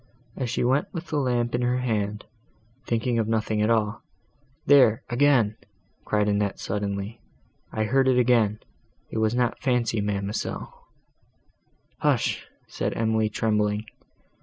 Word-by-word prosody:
As 130 -3 -3
she 120 - -1
went 130 +4 +1
with 170 -1 -6
the 150 - 0
lamp 120 -3 0
in 120 - 0
her 125 +1 +1
hand, 105 -4 -2 0.6
thinking 115 +1 0
of 110 - 0
nothing 110 -1 0
at 105 - +2
all—There, 115 +3 +1
again!" 120 -5 +3 0.5
cried 105 -1 +1
Annette 100 -1 0
suddenly—"I 100 +2 -5
heard 130 +5 +2
it 130 -1 +4
again!—it 115 -2 -1
was 110 +1 +1
not 125 -1 0
fancy, 120 -4 +1
ma'amselle!" 100 0 -3 1.3
"Hush!" - - 0 0.2
said - - -3
Emily, 110 -1 +1
trembling. 105 -1 0
115 Hz, 120 wpm, -25 LUFS, 105-125 Hz, 1.3 s, it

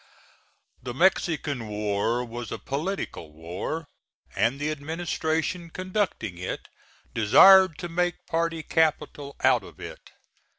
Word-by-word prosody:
The 120 -1 -6
Mexican 155 - +1
war 105 +3 -1
was 120 -1 -7
a - - -3
political 140 - -4
war, 90 - -5 0.5
and 115 +7 +1
the 150 +1 -1
administration 160 +2 -2
conducting 185 - -2
it 90 - -5 0.5
desired 185 - +7
to 175 - -5
make 175 +1 -1
party 165 -1 -1
capital 150 -3 0
out 130 -4 +4
of - - -14
it. - - -9
150 Hz, 115 wpm, -26 LUFS, 115-170 Hz, 0.5 s, desired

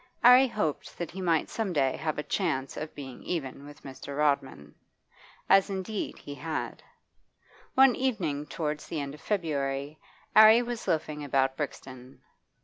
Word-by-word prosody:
'Arry 250 +2 +8
hoped 210 - -3
that 175 - -4
he 190 - -7
might 165 -3 +1
some 220 -4 -3
day 135 -4 +2
have 155 -1 -3
a 150 - -2
chance 135 -9 -1
of 155 0 -6
being 135 -3 -8
even 140 -4 -4
with 145 - -14
Mr. 140 +1 -8
Rodman. 135 - 0 0.7
As 195 +1 +5
indeed 195 +2 -4
he 145 - -9
had. 155 +3 -4 0.9
One 265 -1 +6
evening 170 - -1
towards 150 -2 -4
the 160 - -3
end 140 -1 -4
of 150 - -13
February, 145 -6 -2 0.4
'Arry 220 +2 +8
was 240 -1 -5
loafing 155 -2 -1
about 135 -1 +1
Brixton. 130 -3 -7
150 Hz, 150 wpm, -28 LUFS, 140-190 Hz, 0.9 s, Arry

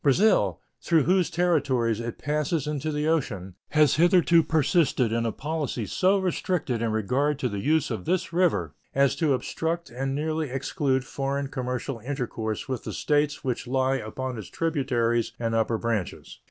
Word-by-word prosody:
Brazil, 140 - +3 0.2
through 165 -3 +3
whose 180 -1 +2
territories 140 -10 +1
it 115 0 -5
passes 150 0 -1
into 150 0 -2
the 150 +1 -1
ocean, 105 - -1 0.2
has 150 -2 +4
hitherto 175 0 +5
persisted 155 -5 +2
in 115 0 0
a - - 0
policy 145 -4 -3
so 190 - +2
restricted 180 - -1
in 115 -1 0
regard 130 +7 0
to 130 - -1
the 100 -4 -4
use 155 +4 +1
of 105 -6 -4
this 180 -2 -1
river 150 - +1 0.2
as 140 0 +3
to 155 -5 +2
obstruct 165 +4 -3
and 135 +2 -2
nearly 155 0 -1
exclude 135 0 -1
foreign 140 +3 -2
commercial 125 -1 -3
intercourse 115 -4 -4
with 130 -4 -3
the - - -5
States 145 -1 0
which 125 -2 -2
lie 130 +1 +1
upon 125 +1 -5
its 105 - -8
tributaries 125 -8 0
and 115 -1 -2
upper 115 0 +1
branches. 115 -5 -3
135 Hz, 165 wpm, -26 LUFS, 120-160 Hz, 0.2 s, hitherto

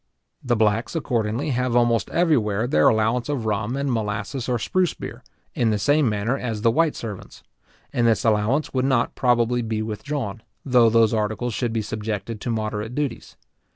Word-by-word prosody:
The 120 -2 +1
blacks, 110 +5 +1
accordingly, 120 -1 -1
have 125 -1 0
almost 120 -3 +2
everywhere 120 - +1
their 75 - +3
allowance 115 +4 +1
of 135 -6 -2
rum, 110 +4 -1
and 140 0 -1
of - - +1
molasses 110 +4 -3
or 125 - +1
spruce 180 +9 0
beer, - - -8 0.3
in 115 - +1
the 105 - +1
same 145 +4 +3
manner 105 +4 0
as 115 -5 -4
the 115 - +5
white 160 +5 +2
servants; 105 -4 -8 0.5
and 120 -1 +2
this 115 0 +2
allowance 110 +7 +1
would 130 -1 +1
not 130 -3 +1
probably 120 -1 +2
be 110 -1 -2
withdrawn, 110 0 -4 0.2
though 125 -4 +5
those 115 0 +4
articles 110 +2 -1
should 120 +1 -1
be 110 -1 -1
subjected 110 0 -4
to - - -4
moderate 110 0 -3
duties. 145 -5 -4
115 Hz, 180 wpm, -23 LUFS, 110-125 Hz, 0.5 s, the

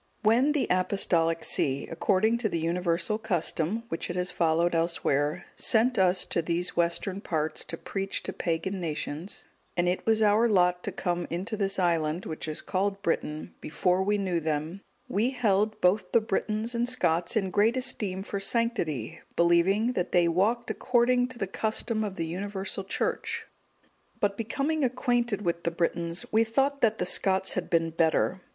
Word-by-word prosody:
_ - - -12
When 250 +7 +4
the 295 - +1
Apostolic 175 -3 +1
see, 135 0 0
according 205 +7 +1
to 225 -3 0
the 170 - -1
universal 170 +4 0
custom 190 0 -1
which 165 - -4
it 175 - -3
has 180 0 -1
followed 170 +1 +2
elsewhere, 155 -3 0
sent 240 +2 +2
us 185 0 +3
to 170 - -1
these 170 +2 -1
western 175 +3 0
parts 155 -5 -2
to 165 - -6
preach 195 +2 -4
to - - -4
pagan 175 +3 -2
nations, 160 +1 -5 0.3
and 175 0 +2
it 180 +1 0
was 220 -1 +3
our 215 +3 +4
lot 180 -3 +3
to - - -2
come 175 -1 -2
into 185 +6 -3
this 195 -2 -1
island, 170 -2 0
which 160 0 -5
is 155 - -3
called 195 +1 -1
Britain, 155 -3 -2
before 180 +4 +1
we 205 +2 +1
knew 185 -4 0
them, 160 +4 -3 0.3
we 215 +5 +1
held 215 -4 +1
both 185 +4 +2
the - - +7
Britons 215 +2 -2
and 240 +1 0
Scots 175 -7 +1
in 195 -4 0
great 220 +6 +3
esteem 210 -7 -1
for 200 0 -4
sanctity, 195 - -1 0.2
believing 185 +7 +3
that 180 - -2
they 175 -2 +4
walked 210 +8 +1
according 245 0 +2
to 255 -1 -10
the 205 - -1
custom 220 +3 -1
of 200 -3 -4
the 165 - -2
universal 195 +3 -4
Church; 190 - -2 0.7
but 200 -1 +1
becoming 275 +8 -1
acquainted 240 -4 0
with 170 -1 -1
the - - +1
Britons, 170 0 -2
we 220 +1 +4
thought 275 +5 0
that 220 -2 +3
the 180 - -1
Scots 190 +1 +2
had 185 - -3
been 165 -1 +1
better. 165 +3 +1
190 Hz, 170 wpm, -28 LUFS, 170-220 Hz, 0.7 s, the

